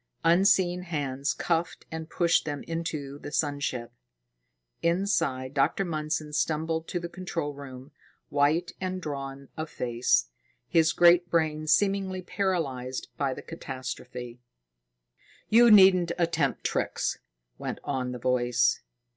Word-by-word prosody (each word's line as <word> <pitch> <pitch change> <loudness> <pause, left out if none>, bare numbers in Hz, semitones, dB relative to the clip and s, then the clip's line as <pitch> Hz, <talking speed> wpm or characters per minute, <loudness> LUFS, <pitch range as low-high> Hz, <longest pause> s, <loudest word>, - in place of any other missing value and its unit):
Unseen 180 +1 +4
hands 145 -5 -2
cuffed 170 0 -2
and 160 0 -6
pushed 170 -1 +2
them 145 -2 -4
into 155 -4 -4
the 145 - -8
sun 145 -2 0
ship. 125 -4 -3 0.9
Inside, 170 -8 0
Dr. 145 +7 +1
Mundson 155 -2 -3
stumbled 160 +1 -1
to 175 - -2
the 170 - -5
control 170 -4 -4
room, 135 -1 -10 0.4
white 150 +5 +2
and 185 0 -2
drawn 140 -3 -6
of 155 0 -4
face, 120 - +1 0.4
his 160 -1 +4
great 175 +1 +5
brain 155 -2 0
seemingly 195 0 +2
paralyzed 140 -11 -2
by 135 -3 -1
the - - -9
catastrophe. 130 -5 -7 1.1
"You 235 +2 +7
needn't 190 -4 +7
attempt 165 -5 0
tricks," - - -1 0.4
went - - -4
on 130 -3 -2
the 125 - -5
voice. 125 0 +2
155 Hz, 120 wpm, -27 LUFS, 135-175 Hz, 1.1 s, You